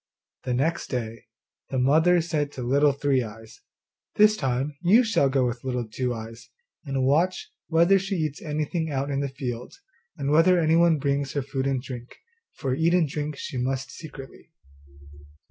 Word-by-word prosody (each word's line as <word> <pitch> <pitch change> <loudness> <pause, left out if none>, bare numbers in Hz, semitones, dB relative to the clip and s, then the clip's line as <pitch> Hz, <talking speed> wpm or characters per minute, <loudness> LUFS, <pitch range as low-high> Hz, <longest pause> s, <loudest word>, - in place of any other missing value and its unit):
The 125 -1 0
next 160 +7 0
day 115 -2 -4 0.4
the 135 - -2
mother 160 +7 +4
said 150 -3 -2
to 125 - -6
Little 140 +4 +3
Three 140 -1 +1
eyes, 115 0 -10 0.5
'This 210 0 +5
time 135 -1 -2
you 205 +8 +5
shall 220 - +2
go 135 -1 +2
with 120 -1 -3
Little 125 -3 -2
Two 125 +3 -2
eyes 115 0 -8 0.3
and 135 -3 -1
watch 165 +7 +1 0.2
whether 170 +4 +4
she 195 +1 -3
eats 155 -4 -2
anything 155 +1 -2
out 140 0 -2
in 135 - -1
the 140 0 -1
fields, 125 - -6 0.4
and 140 0 -2
whether 165 +4 +5
anyone 165 0 +4
brings 140 -1 -1
her 140 - -1
food 135 0 -2
and 135 -2 -1
drink, 125 -2 -9 0.4
for 135 -4 -2
eat 165 +5 +2
and 170 -4 +3
drink 150 +1 -4
she 130 - -5
must 130 0 -2
secretly. 135 0 -11
140 Hz, 170 wpm, -25 LUFS, 130-160 Hz, 0.5 s, This